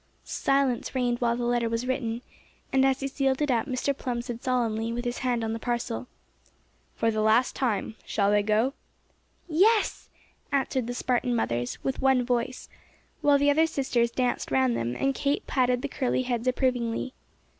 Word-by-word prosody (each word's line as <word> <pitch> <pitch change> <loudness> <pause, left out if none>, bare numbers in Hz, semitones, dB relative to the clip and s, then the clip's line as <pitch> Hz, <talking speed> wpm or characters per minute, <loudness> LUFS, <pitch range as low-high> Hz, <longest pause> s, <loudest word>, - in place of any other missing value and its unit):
Silence 275 -2 0
reigned 245 -2 +1
while 235 -1 +2
the 245 - -2
letter 240 -1 +1
was 230 +2 -2
written, 240 -2 -2 0.5
and 265 0 +4
as 265 0 +1
he 275 - -1
sealed 270 -1 0
it 295 -2 +1
up 235 +2 +1
Mr. 270 +1 -1
Plum 245 -2 -3
said 240 -1 -6
solemnly, 230 -3 0
with 240 +1 -3
his 240 0 -2
hand 245 -3 0
on 225 0 -1
the 225 - -4
parcel: 240 0 -3 0.9
"For 225 0 +1
the 215 -1 -1
last 220 +4 +3
time, 220 -4 -1
shall 200 -1 +1
they 205 0 +4
go?" 220 +6 +1 0.7
"Yes!" 405 +7 +2 0.4
answered 265 -3 0
the 245 - -4
Spartan 245 -1 0
mothers 120 - -1
with 265 - -2
one 265 -2 +3
voice, 245 +1 -2 0.5
while 290 -1 +5
the 285 +1 +4
other 320 +3 +4
sisters 260 -6 0
danced 250 +1 -1
round 130 -2 +2
them, 115 +1 -2
and 275 0 +1
Kate 280 +1 -1
patted 250 -1 +1
the - - 0
curly 255 -2 -1
heads 245 -1 -2
approvingly. 255 -1 0
245 Hz, 175 wpm, -27 LUFS, 230-265 Hz, 0.9 s, while